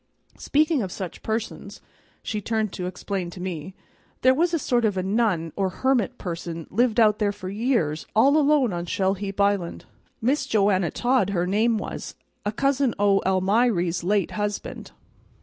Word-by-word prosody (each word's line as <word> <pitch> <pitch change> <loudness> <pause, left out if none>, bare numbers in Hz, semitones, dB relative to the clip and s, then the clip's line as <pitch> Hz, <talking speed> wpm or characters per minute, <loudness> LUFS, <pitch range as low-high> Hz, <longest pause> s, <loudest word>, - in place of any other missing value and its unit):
Speaking 305 -1 +2
of 190 -3 -4
such 185 -2 -6
persons," 220 0 -4 0.4
she 210 -1 -3
turned 220 -1 -1
to 180 - -4
explain 185 0 -4
to 175 - -10
me, 180 0 -5 0.5
"there 260 +1 +6
was 335 +5 +1
a 335 - +1
sort 245 -5 0
of 205 -3 +1
a 185 - 0
nun 190 -6 0
or 195 -1 0
hermit 250 +3 0
person 170 -2 -5
lived 235 +2 +2
out 215 -2 +4
there 205 -2 +2
for 185 -2 -7
years 200 - 0
all 275 +7 +5
alone 290 -7 +3
on 175 0 -4
Shell 190 +2 +1
heap 200 0 -6
Island. 200 -4 0 0.3
Miss 265 +6 0
Joanna 195 -4 +2
Todd, 250 -2 +1
her 180 -3 0
name 220 +5 +2
was, - - -6 0.3
a - - +1
cousin 275 +1 +1
o' 200 -1 +3
Almiry's 190 -2 +2
late 200 0 +1
husband." 205 -1 -4
205 Hz, 165 wpm, -24 LUFS, 185-235 Hz, 0.5 s, there